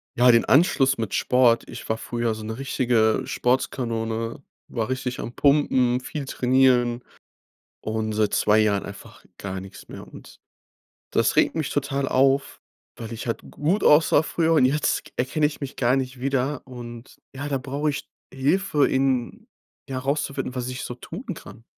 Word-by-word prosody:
ja, 125 +1 +6
den 115 - +4
Anschluss 135 -3 +4
mit 110 -4 -3
Sport 120 -2 +3
ich - - -8
war 110 - 0
früher 120 -1 -2
so 110 0 -8
'ne 110 +1 -5
richtige 120 -5 +1
Sportskanone, 115 -1 -1 0.3
war 115 -2 -2
richtig 130 -1 -3
am 120 - -5
Pumpen, 130 -4 +3
viel 145 +3 -6
trainieren 125 -2 +2 0.8
und 110 0 -2
seit 105 -1 +1
2 105 +1 +3
Jahren 105 -2 +1
einfach 100 0 -12
gar 95 -1 -5
nix 95 0 -11
mehr. - - -9
Und - - -14 0.7
das - - +2
regt - - +3
mich 155 -4 -2
total 140 -1 -1
auf, 135 +1 +2 0.4
weil 115 -1 -7
ich 115 - -6
halt 115 - -3
gut 170 +8 0
aussah 150 0 +5
früher 165 0 +1
und 140 -5 +5
jetzt 150 +3 0
k - - -13
erkenn 130 +5 -1
ich 150 0 +1
mich 140 -2 -5
gar 125 +1 +2
nicht 130 -1 -3
wieder. 135 +1 -1
Und 120 -1 -10 0.2
ja, 145 +2 -5
da 140 - -1
brauch 140 +3 -2
ich 145 0 -4 0.2
Hilfe, 145 +3 +2
in 130 -2 -1 0.4
ja 130 -1 -3
rauszufinden, 140 -1 -2
was 125 -1 -3
ich 125 0 -5
so 120 - -5
tun 170 - -9
kann. 115 -5 -13
130 Hz, 170 wpm, -24 LUFS, 115-140 Hz, 0.8 s, ja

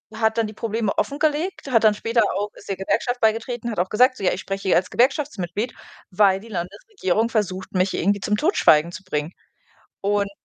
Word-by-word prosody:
hat 220 0 +1
dann 225 - +1
die 215 - -9
Probleme 220 -1 -2
offengelegt, 300 +3 -1
hat 230 -2 +4
dann 215 -1 +6
später 230 +2 +1
auch 205 +1 -2
ist - - -15
der 195 - -2
Gewerkschaft 245 +6 -1
beigetreten, 230 +2 0
hat - - -6
auch 185 - 0
gesagt, 255 +4 +4
so: 195 - -8
„Ja, - - +3
ich - - -5
spreche 195 0 -4
hier 170 - +5
als 185 +1 0
Gewerkschaftsmitglied, 245 - 0 0.4
weil 190 0 +4
die 220 - -14
Landesregierung 205 - -2
versucht, 190 -5 -2
mich 185 +1 +1
irgendwie 200 +3 +1
zum 210 - 0
Totschweigen 170 - +4
zu 195 - -9
bringen.“ 155 -2 -3 0.7
Und, 200 0 0
210 Hz, 195 wpm, -22 LUFS, 190-235 Hz, 0.7 s, dann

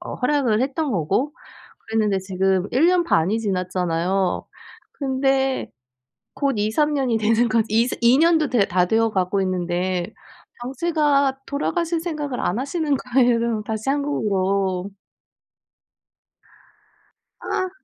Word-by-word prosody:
어 350 - -6
허락을 250 -5 +1
했던 280 +3 -1
거고 200 - 0 0.6
그랬는데 215 -3 +1
지금 190 0 0
1 275 +7 +4
년 355 0 +3
반이 205 - +1
지났잖아요. 185 -2 -1 0.5
근데 270 -1 0 0.6
곧 280 -2 0
2-3 220 +9 +1
년이 260 -5 +1
되는 225 +2 +2
것 225 0 +2
이스 230 +4 +1
2 240 +3 +5
년도 320 -2 +3
돼 230 -6 +3
다 180 0 +2
되어 225 +3 +2
가고 190 0 0
있는데 180 +1 -2 0.5
당최가 280 -1 +1
돌아가실 330 +4 -1
생각을 300 -6 -4
안 185 - -1
하시는 285 +2 -1
거예요 240 -4 +1
다시 220 +3 -4
한국으로. 200 -9 -1 2.5
아. 370 0 -2
235 Hz, 225 characters per minute, -22 LUFS, 195-280 Hz, 2.5 s, 2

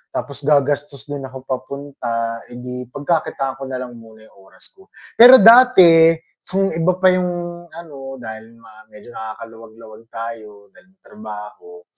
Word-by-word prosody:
Tapos 140 - -5
gagastos 145 -1 0
din 145 -1 -6
ako 130 0 -12
papunta, 125 -3 -5
eh 120 - -12
di 125 0 -8
pagkakitaan 140 -3 -3
ko 135 - -7
na 130 -1 -5
lang 125 - -10
muna 110 -1 -17
'yung 110 - -22
oras - - -12
ko. 385 0 -22 0.3
Pero 245 +3 +10
dati 190 -8 +7 0.3
kung 195 +1 -1
iba 170 +3 0
pa 185 0 +4
'yung 180 0 0 0.4
ano 140 -5 -10
dahil 110 -1 -10
nga 110 -1 -18
medyo 105 +2 -15
nakakaluwag-luwag 110 0 -11
tayo 110 -3 -9
dahil - - -22
may 190 - -57
trabaho. 105 - -12
130 Hz, 150 wpm, -18 LUFS, 115-165 Hz, 0.4 s, Pero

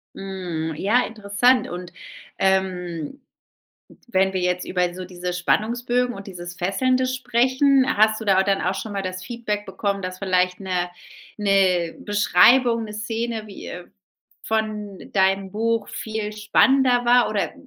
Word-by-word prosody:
Mhm, 175 -5 -4
ja, 220 +9 +2
interessant. 220 +4 +2
Und, 175 0 -7 0.5
ähm, 185 - -1 0.9
wenn 190 -3 +2
wir 190 - -1
jetzt 180 0 0
über 180 -1 0
so 185 0 -6
diese 180 0 -5
Spannungsbögen 240 +6 0
und 195 -2 -9
dieses 175 -2 -8
Fesselnde 255 +8 +1
sprechen, 260 +2 +2
hast 215 +1 +3
du 220 - -6
da 195 -2 +3
au 190 - +5
dann 195 0 0
auch 185 +2 0
schon 215 +1 -5
mal 195 - -2
das 185 0 -5
Feedback 210 -2 -4
bekommen, 200 -1 -2
dass 185 0 -5
vielleicht 185 -1 +1
'ne 180 -2 -2 0.5
'ne 190 -5 +2
Beschreibung, 230 +3 +4
'ne 210 - -8
Szene, 225 +1 -3
wie, 200 - -10
äh 180 0 -8 0.6
von 215 -3 -2
deinem 190 0 +1
Buch 225 0 -1
viel 220 -1 -4
spannender 245 +4 +3
war 245 0 +4
oder 210 - -1
200 Hz, 145 wpm, -22 LUFS, 185-230 Hz, 0.9 s, au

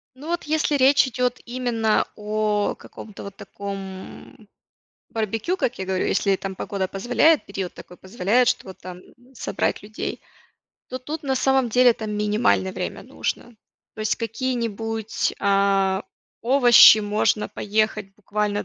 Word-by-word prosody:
Ну, 280 +4 -11
вот 345 +1 -2
если 310 0 0
речь 275 0 +5
идёт 250 0 -1
именно 240 -3 0
о 210 0 -1
каком-то 210 -2 -11
вот 200 -1 -9
таком 195 +1 -9 0.6
барбекю, 225 - -2
как 250 - -2
я 190 - -4
говорю, 190 -1 -1
если 200 -1 +2
там 190 0 -6
погода 190 -1 -3
позволяет, 245 - +2
период 195 -2 -5
такой 180 - -13
позволяет, 225 +5 +1
что 255 - -1
вот 190 - -10
там 180 0 -9 0.3
собрать 255 - -2
людей, 215 +2 -6 0.7
то 255 - -5
тут 300 +5 -6
на 270 -2 0
самом 265 -1 +2
деле 245 +2 +5
это 220 -1 -3
минимальное 210 -2 +1
время - - -5
нужно. 240 0 -5 0.4
То 220 - -9
есть 215 0 0
какие-нибудь, 225 -2 -2
а, 195 -1 +2 0.4
овощи 240 -3 +8
можно 210 0 0
поехать 215 -1 -1
буквально 210 0 -2
215 Hz, 140 wpm, -23 LUFS, 200-250 Hz, 0.7 s, овощи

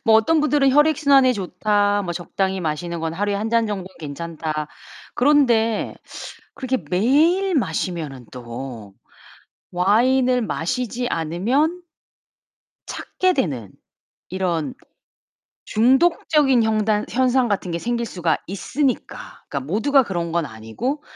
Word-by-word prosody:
뭐 220 -1 +5
어떤 310 +8 +3
분들은 290 -2 +3
'혈액순환에 280 -3 +4
좋다. 205 +1 0
뭐 175 - -3
적당히 190 +2 -2
마시는 165 +1 -3
거는 165 0 -3
하루에 205 0 0
1 210 +3 -2
잔 230 -1 +2
정도는 195 -3 -4
괜찮다.' 155 0 -5 0.5
그런데 240 -5 +2 0.6
그렇게 260 -1 -2
매일 315 - +3
마시면은 160 - -2
또 120 -4 -8 0.8
와인을 245 +7 +3
마시지 245 +5 -2
않으면 245 - 0 1.0
찾게 370 0 -1
되는 135 - -2 0.6
이런 180 0 -2 0.9
중독적인 265 +2 +3
형단 215 -1 +1
현상 255 0 +2
같은 195 -3 -2
게 170 - -2
생길 235 +4 -2
수가 175 -6 -1
있으니까 250 +8 -3
그러니까 140 - -3
모두가 270 +8 +3
그런 175 -7 -3
건 170 -2 0
아니고 125 - -4
210 Hz, 260 characters per minute, -21 LUFS, 170-260 Hz, 1.0 s, 뭐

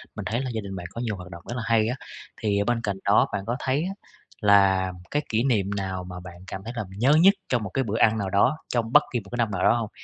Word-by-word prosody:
mình - - -6
thấy 115 +3 -1
là 130 - -3
gia 110 - -2
đình 100 -1 -7
bạn 90 -2 -6
có 115 - -6
nhiều 110 -4 -2
hoạt 90 -1 -10
động 85 0 -10
rất 120 - -3
là 115 - -3
hay 110 -1 +3
á. 125 - -1 0.5
Thì, 105 -3 +1
ở, 100 - +1
bên 120 -1 0
cạnh 100 -2 -2
đó 100 +1 +5
bạn 100 -1 -2
có 120 +3 -1
thấy 135 +3 0
á 195 - -4 0.5
là 95 -2 +5 0.2
cái 145 - +1
kỷ 115 +2 +1
niệm 105 -8 +1
nào 95 -2 -3
mà 90 0 -8
bạn 90 -1 -10
cảm 95 - -6
thấy 115 +3 -6
là 110 - -2
nhớ 130 +7 +4
nhất 195 +3 +7 0.2
trong 120 -4 +1
một 100 - -4
cái 135 +8 0
bữa 110 -2 -2
ăn 110 -1 +4
nào 100 -3 -2
đó, 100 +10 +3 0.2
trong 115 -2 0
bất 150 - +8
kỳ 120 - +1
một 100 -3 -13
cái 120 - -4
năm 115 -3 +1
nào 95 - -2
đó - - +6
hông? 115 -3 -3
110 Hz, 305 wpm, -25 LUFS, 95-120 Hz, 0.5 s, bất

